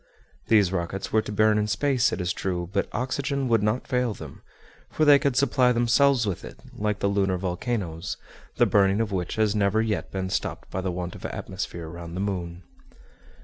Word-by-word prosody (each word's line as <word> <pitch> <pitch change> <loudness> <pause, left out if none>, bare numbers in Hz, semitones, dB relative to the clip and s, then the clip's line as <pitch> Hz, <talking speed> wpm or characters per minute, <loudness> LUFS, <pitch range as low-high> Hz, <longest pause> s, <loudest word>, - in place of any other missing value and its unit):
These 105 -5 +4
rockets 95 +1 -3
were 110 - +4
to 105 - -7
burn 110 0 +3
in 105 - 0
space, 125 +5 +2
it 90 - -3
is 90 -1 -1
true; 90 -2 -3
but 100 - 0
oxygen 135 +2 -1
would 115 -3 +3
not 105 +4 0
fail 125 -4 0
them, - - -10 0.5
for 155 - +1
they 145 -1 +8
could 140 -2 0
supply 130 -2 +3
themselves 125 +1 +3
with 100 -4 -3
it, 60 -1 -9 0.2
like 105 -1 -1
the - - +2
lunar 100 -2 +1
volcanoes, 90 -2 -3 0.4
the - - +4
burning 100 0 +3
of 110 -2 -1
which 90 -3 -2
has 110 -1 +2
never 100 +1 +2
yet 110 -2 -1
been 95 -1 -3
stopped - - -3
by 95 - -2
the 95 - -2
want 90 0 -4
of - - -11
atmosphere 85 -2 -5
round 85 +1 -8
the - - -2
moon. 90 -3 -3
105 Hz, 195 wpm, -25 LUFS, 90-120 Hz, 0.5 s, they